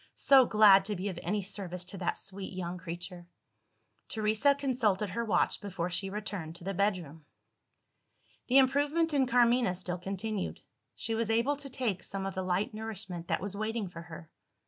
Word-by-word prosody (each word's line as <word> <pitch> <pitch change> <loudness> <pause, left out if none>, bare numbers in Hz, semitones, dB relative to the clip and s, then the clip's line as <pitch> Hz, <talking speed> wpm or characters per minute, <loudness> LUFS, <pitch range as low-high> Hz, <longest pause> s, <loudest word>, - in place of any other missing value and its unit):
So 270 -2 +6
glad 205 -3 +7
to 210 0 -1
be 195 +2 -3
of 180 -3 -6
any 200 +4 -1
service 185 -2 -4
to 190 +2 -9
that 175 - -1
sweet 195 0 -6
young 180 -1 -4
creature!" 175 +1 -7 0.8
Teresa 220 +6 +2
consulted 225 -8 0
her 235 - -1
watch 220 - +1
before 180 -3 -3
she 195 +2 0
returned 195 -5 -5
to 170 - -11
the 195 +2 -2
bedroom. 175 -6 -1 1.2
The 260 - +5
improvement 290 +5 +3
in 270 -3 +3
Carmina 240 -4 +3
still 180 0 -4
continued: 195 +2 -3 0.4
she 225 - -3
was 225 0 -1
able 235 +6 +2
to 285 -1 -7
take 245 -8 -2
some 195 -1 -4
of 195 - -3
the 190 - -2
light 185 +3 -1
nourishment 210 -6 -6
that - - 0
was 200 +1 -4
waiting 215 -1 -2
for 165 -1 -9
her. 165 -1 -11
200 Hz, 175 wpm, -31 LUFS, 180-230 Hz, 1.2 s, glad